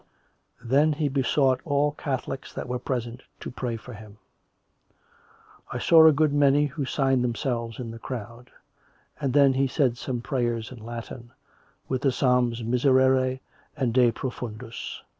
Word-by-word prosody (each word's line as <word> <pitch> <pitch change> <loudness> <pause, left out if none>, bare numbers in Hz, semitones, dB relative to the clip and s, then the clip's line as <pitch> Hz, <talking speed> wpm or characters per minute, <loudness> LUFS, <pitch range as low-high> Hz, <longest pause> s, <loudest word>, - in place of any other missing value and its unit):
then 140 +6 +3
he 150 0 -1
besought 135 -1 +1
all 145 -1 +1
Catholics 135 -2 -5
that - - -5
were 125 0 -3
present 120 -1 -4 0.2
to - - -7
pray 120 -2 -4
for 125 +2 -11
him; 105 -1 -12 1.5
I - - -3
saw 160 -1 +7
a - - +8
good 150 0 +2
many 145 0 +4
who 145 0 -4
signed 135 -2 +1
themselves 120 -2 -2
in 120 -2 -5
the 115 - -9
crowd; 120 0 -7 0.7
and 140 -3 -1
then 140 0 +5
he 135 +1 +1
said 125 -3 0
some 125 0 -3
prayers 120 -3 -2
in 120 -4 -11
Latin; 120 +1 -8 0.6
with 130 -1 -2
the 135 - +2
psalms 125 -2 +1
Miserere 130 +1 +2 0.4
and 130 -5 0
De 125 -1 +4
Profundis. 120 -2 -6
130 Hz, 150 wpm, -25 LUFS, 120-140 Hz, 1.5 s, a